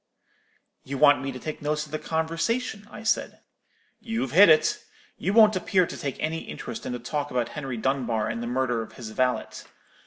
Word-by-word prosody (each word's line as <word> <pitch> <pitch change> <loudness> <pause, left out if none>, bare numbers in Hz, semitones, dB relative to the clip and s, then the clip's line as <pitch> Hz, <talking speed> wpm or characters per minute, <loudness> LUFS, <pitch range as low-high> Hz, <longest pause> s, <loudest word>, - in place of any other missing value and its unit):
"'You 140 +1 -5
want 145 -1 +6
me 135 0 -3
to 130 - -7
take 155 +4 -6
notes 150 +1 -1
of 150 - -16
the 155 - -3
conversation,' 200 +7 -2
I 215 - -10
said. 220 - 0 0.6
"'You've 225 - -3
hit 185 +5 +8
it. 155 -1 +4 0.4
You 190 - 0
won't 215 -1 +6
appear 185 0 +2
to - - -7
take 140 -2 -4
any 160 +1 -1
interest - - -7
in - - -3
the - - -2
talk 145 +4 -3
about 125 -3 -1
Henry 135 -5 -5
Dunbar 120 -3 0
and 115 - -3
the 120 - -4
murder 125 -1 0
of 110 - -9
his 115 -3 -8
valet. 125 +2 +1
145 Hz, 195 wpm, -26 LUFS, 125-165 Hz, 0.6 s, hit